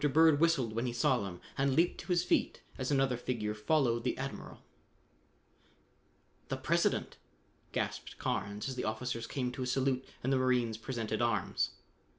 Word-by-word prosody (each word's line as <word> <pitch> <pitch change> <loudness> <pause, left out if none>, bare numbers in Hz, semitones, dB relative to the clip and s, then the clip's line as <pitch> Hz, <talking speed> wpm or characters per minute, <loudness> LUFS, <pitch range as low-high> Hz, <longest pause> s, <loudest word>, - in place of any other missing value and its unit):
Bird 160 -2 +6
whistled 150 -9 +3
when 115 +3 -1
he 120 - -2
saw 130 0 +3
them 95 -3 -5 0.2
and 135 -1 +2
leaped 170 +2 +3
to - - -14
his 175 -2 +2
feet - - +1
as 130 -1 -3
another 135 -3 +3
figure 115 -4 -2
followed 120 +1 +1
the 125 - 0
admiral. 135 +1 -6 1.8
"The - - -2
President!" - - +1 0.5
gasped - - -3
Carnes 100 +4 -2
as 135 - -2
the 125 - -3
officers 115 +1 -2
came 125 -3 -2
to 130 - -6
a 125 - -1
salute 130 0 +1 0.2
and 130 +2 +2
the - - +4
marines 125 -3 +2
presented 115 -3 -2
arms. 115 -6 0
125 Hz, 165 wpm, -33 LUFS, 115-135 Hz, 1.8 s, Bird